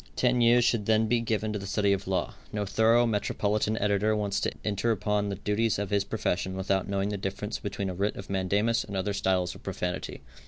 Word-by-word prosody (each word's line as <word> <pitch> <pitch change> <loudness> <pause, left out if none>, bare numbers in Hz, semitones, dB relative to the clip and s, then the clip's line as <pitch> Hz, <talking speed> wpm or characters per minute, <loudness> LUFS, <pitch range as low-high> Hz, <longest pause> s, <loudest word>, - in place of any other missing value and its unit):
Ten 125 -1 +2
years 120 +1 +5
should 105 -4 +1
then 110 0 +4
be 120 +2 +2
given 110 -1 -1
to 105 - -2
the 100 - -7
study 100 0 +2
of 100 0 -3
law. 95 -1 -1 0.2
No 105 -1 -2
thorough, 115 +4 +4
metropolitan 105 0 0
editor 105 +1 +2
wants 100 -1 -1
to - - -1
enter 105 +2 0
upon 105 -1 0
the 100 - -2
duties 105 +3 0
of 100 -1 -3
his 100 -1 +2
profession 95 -4 -2
without 95 0 0
knowing 100 0 0
the 105 - -2
difference 100 +3 -4
between 100 -1 -3
a 95 - -3
writ 100 +3 -1
of 100 - -8
mandamus 100 +4 +1
and 100 -2 -5
other 100 +2 -1
styles 95 -2 0
of - - -13
profanity. 90 0 -4
105 Hz, 220 wpm, -28 LUFS, 100-110 Hz, 0.2 s, years